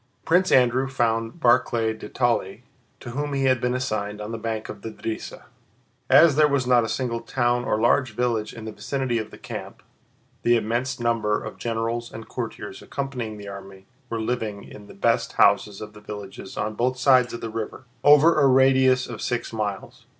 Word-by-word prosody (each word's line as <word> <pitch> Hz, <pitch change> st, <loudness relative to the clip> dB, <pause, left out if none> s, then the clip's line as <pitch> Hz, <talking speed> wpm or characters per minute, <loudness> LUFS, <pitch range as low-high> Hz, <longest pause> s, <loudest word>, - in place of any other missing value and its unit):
Prince 180 Hz, +3 st, +3 dB
Andrew 130 Hz, +1 st, +4 dB
found 115 Hz, 0 st, -1 dB
Barclay 120 Hz, -4 st, +2 dB
de 110 Hz, -, -10 dB
Tolly, 120 Hz, -6 st, -1 dB, 0.4 s
to 120 Hz, -, -8 dB
whom 145 Hz, +3 st, -3 dB
he 135 Hz, -1 st, 0 dB
had 130 Hz, -2 st, +3 dB
been 125 Hz, 0 st, 0 dB
assigned, 110 Hz, -5 st, -3 dB
on 105 Hz, +1 st, -6 dB
the 115 Hz, -, -4 dB
bank 110 Hz, -1 st, -3 dB
of -, -, -9 dB
the 115 Hz, -, -5 dB
Drissa. 110 Hz, 0 st, -6 dB, 0.7 s
As 160 Hz, -4 st, +7 dB
there 155 Hz, 0 st, +5 dB
was 140 Hz, -3 st, 0 dB
not 125 Hz, -1 st, +4 dB
a 110 Hz, -, -3 dB
single 120 Hz, -3 st, -2 dB
town 120 Hz, +1 st, 0 dB
or 105 Hz, -, 0 dB
large 120 Hz, 0 st, +2 dB
village 115 Hz, -3 st, -1 dB
in 115 Hz, -2 st, -9 dB
the 110 Hz, -, -5 dB
vicinity 120 Hz, +3 st, -2 dB
of 110 Hz, -, -5 dB
the -, -, -13 dB
camp, -, -, -8 dB, 0.6 s
the 120 Hz, -, +4 dB
immense 120 Hz, +4 st, -2 dB
number 115 Hz, -3 st, 0 dB
of -, -, -8 dB
generals 115 Hz, 0 st, -2 dB
and 110 Hz, 0 st, -9 dB
courtiers 110 Hz, -5 st, -6 dB
accompanying 125 Hz, -6 st, -5 dB
the 100 Hz, -1 st, -9 dB
army 95 Hz, -1 st, -10 dB, 0.2 s
were 115 Hz, -, -3 dB
living 110 Hz, -3 st, -3 dB
in 105 Hz, -1 st, -12 dB
the -, -, -13 dB
best 115 Hz, +2 st, +1 dB
houses 100 Hz, 0 st, +3 dB
of 105 Hz, 0 st, -8 dB
the 105 Hz, -, -14 dB
villages 105 Hz, -2 st, -9 dB
on 110 Hz, -, -2 dB
both 125 Hz, +3 st, 0 dB
sides 130 Hz, -2 st, +4 dB
of 120 Hz, -, -6 dB
the 115 Hz, -, -5 dB
river, 115 Hz, +3 st, -5 dB, 0.2 s
over 150 Hz, +3 st, +6 dB
a 140 Hz, -, +6 dB
radius 130 Hz, -1 st, +4 dB
of 115 Hz, -3 st, -8 dB
six 120 Hz, -1 st, -3 dB
miles. 105 Hz, -3 st, -5 dB
115 Hz, 195 wpm, -24 LUFS, 110-130 Hz, 0.7 s, As